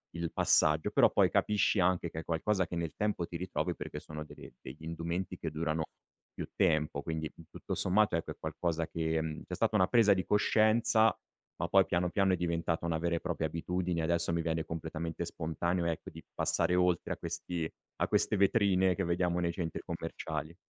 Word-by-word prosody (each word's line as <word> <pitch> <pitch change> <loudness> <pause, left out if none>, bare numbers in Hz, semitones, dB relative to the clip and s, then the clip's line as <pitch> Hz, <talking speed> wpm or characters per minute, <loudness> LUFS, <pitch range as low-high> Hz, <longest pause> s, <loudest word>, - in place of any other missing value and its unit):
il 85 -1 -3
passaggio. 75 0 +3
Però - - +5
poi - - +3
capisci 105 -1 +2
anche 90 -1 +2
che 80 - -5
è - - -6
qualcosa 95 +4 0
che - - -5
nel 85 -3 -3
tempo 105 -4 -1
ti 85 - -6
ritrovi 90 +1 -2
perché - - -6
sono 75 0 -7
degli - - -12
degli 70 +5 -10
indumenti 85 +3 -3
che 80 - -3
durano 80 0 -1 0.5
più - - -5
tempo. 75 -2 +1
Quindi 80 0 -4 0.2
tutto - - -6
sommato 100 0 +2
è 85 - +1
per - - -8
qualcosa 80 +1 -2
che 80 -1 -1
mhmm, 80 -1 -5
c'è 90 - -4
stata 110 +2 +1
una 95 -3 +4
presa 115 -3 +5
di 95 -1 -1
coscienza 110 0 +3 0.4
ma - - -2
poi - - +5
piano 90 0 0
piano 95 0 +2
è - - +4
diventata 85 -1 -1
una 80 -1 0
vera 85 +1 0
e 85 - -1
propria 85 -3 -2
abitudine 90 +1 -2
e - - -2
adesso 85 +1 +2
mi 85 - +1
viene 80 -1 -1
completamente 80 +1 -4
spontaneo, 85 +1 -2
ecco, 85 -1 -3
di 80 0 -11
passare 90 - +1
oltre 90 -1 +2
a - - -8
questi 85 -2 -3 0.3
a - - +3
queste 105 - +2
vetrine 95 -2 +3
che 100 - -1
vediamo 85 0 +1
nei 85 -1 0
centri 85 -2 -4
commerciali. 80 +2 -5
85 Hz, 195 wpm, -32 LUFS, 80-90 Hz, 0.5 s, Però